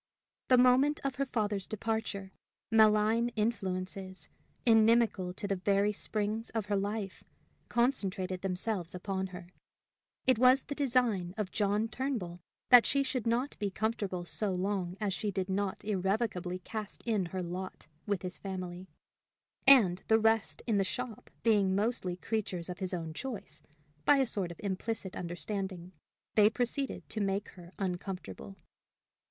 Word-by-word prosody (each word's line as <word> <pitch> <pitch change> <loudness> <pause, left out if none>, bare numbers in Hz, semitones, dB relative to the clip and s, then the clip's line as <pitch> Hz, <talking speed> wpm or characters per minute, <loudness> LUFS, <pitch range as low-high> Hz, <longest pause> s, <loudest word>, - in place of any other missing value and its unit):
The 255 - +6
moment 255 +4 +5
of 270 -2 -1
her 275 0 0
father's 210 -5 -1
departure, 215 -3 -3 0.4
malign 220 +1 +4
influences, 190 -3 -3 0.4
inimical 225 -4 +4
to 205 - -4
the 195 -1 0
very 200 +2 +2
springs 215 +2 -2
of 220 -3 0
her 205 -1 0
life, 200 0 -3 0.5
concentrated 195 -7 0
themselves 185 -1 -2
upon 190 +1 -2
her: 180 -1 -10 0.8
it 255 -3 +4
was 255 +2 +6
the 285 - -5
design 240 -10 +1
of 210 -3 -2
John 210 +1 +1
Turnbull 225 -9 -3 0.3
that 245 -2 +9
she 280 -1 +2
should 255 -3 -2
not 245 +5 0
be 205 - 0
comfortable 200 -3 -2
so 205 +3 -1
long 185 -1 -2
as 205 -3 -1
she 210 - -2
did 190 -1 -2
not 200 +1 -2
irrevocably 190 -2 -1
cast 210 +3 -7
in 210 -6 0
her 185 +1 -4
lot 180 +2 -6 0.2
with 200 -3 -1
his 180 -1 -5
family; 185 -1 -6 0.8
and, 205 -10 +8
the 220 - +5
rest 220 -8 +2
in 220 -4 +2
the - - +3
shop 240 +3 -5
being 205 -4 +3
mostly 205 -4 0
creatures 185 -3 -2
of 180 - -6
his 185 -2 -3
own 165 -3 -4
choice, 195 - -6 0.4
by 290 - +6
a 270 - +3
sort 195 -6 -2
of 170 - -10
implicit 200 0 -3
understanding 180 0 -4 0.4
they 210 -1 +6
proceeded 250 +4 -2
to 215 - -2
make 200 +1 -1
her 175 -1 -13
uncomfortable. 190 +1 -5
205 Hz, 145 wpm, -32 LUFS, 185-225 Hz, 0.8 s, that